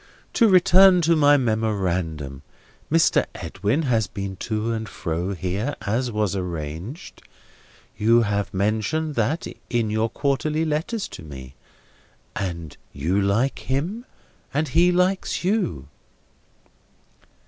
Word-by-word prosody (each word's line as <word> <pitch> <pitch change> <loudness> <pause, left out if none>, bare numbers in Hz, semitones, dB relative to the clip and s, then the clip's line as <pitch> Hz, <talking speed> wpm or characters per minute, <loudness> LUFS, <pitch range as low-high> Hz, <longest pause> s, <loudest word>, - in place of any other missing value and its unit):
To 230 -3 +4
return 185 0 +6
to 165 +1 +3
my 145 -1 +5
memorandum. 95 - -1 0.5
Mr. 165 +1 +3
Edwin 105 - -1
has 115 -7 +1
been 100 0 -5
to 110 +3 -2
and 110 -2 -3
fro 90 +2 -3
here, 95 - -2
as 120 +4 -1
was 105 -3 0
arranged. 85 - -6 0.7
You 115 +3 +4
have 100 -1 -1
mentioned 110 +11 0
that, 140 +7 0 0.2
in 115 -3 0
your 110 +1 +1
quarterly 150 +4 0
letters 165 +8 -2
to - - -9
me. 65 -4 -10 0.8
And 85 -6 -4
you 85 +8 0
like 105 +8 +1
him, 175 - -3 0.5
and 150 0 +1
he 170 +6 +4
likes 180 +1 0
you." 180 - -1
110 Hz, 115 wpm, -23 LUFS, 95-155 Hz, 0.8 s, return